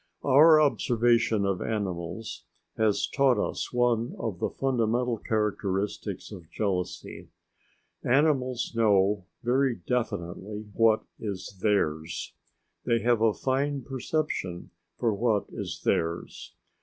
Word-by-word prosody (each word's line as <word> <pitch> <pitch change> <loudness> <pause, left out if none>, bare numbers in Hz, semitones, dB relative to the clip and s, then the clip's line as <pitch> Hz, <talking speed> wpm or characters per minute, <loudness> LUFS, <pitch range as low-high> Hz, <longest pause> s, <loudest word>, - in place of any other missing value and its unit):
Our 155 +4 +7
observation 120 -6 +2
of 95 -2 -1
animals 95 -1 -4 0.3
has 110 -2 +2
taught 135 -4 +3
us - - -2
one 120 -1 +1
of 100 -6 -4
the - - 0
fundamental 120 -2 0
characteristics 105 -2 -2
of 85 -3 -10
jealousy. 95 -4 -3 0.7
Animals 130 -3 +1
know 100 -3 +3 0.2
very 130 +1 +2
definitely 105 0 -3
what 115 -1 +3 0.2
is 100 -2 -5
theirs. 80 -6 0 0.5
They 115 -1 +1
have 120 -2 +3
a 115 -1 +5
fine 135 +1 -1
perception 130 - -3 0.3
for 115 -3 +1
what 110 0 +1
is - - -6
theirs. 85 +1 -2
115 Hz, 105 wpm, -27 LUFS, 100-125 Hz, 0.7 s, Our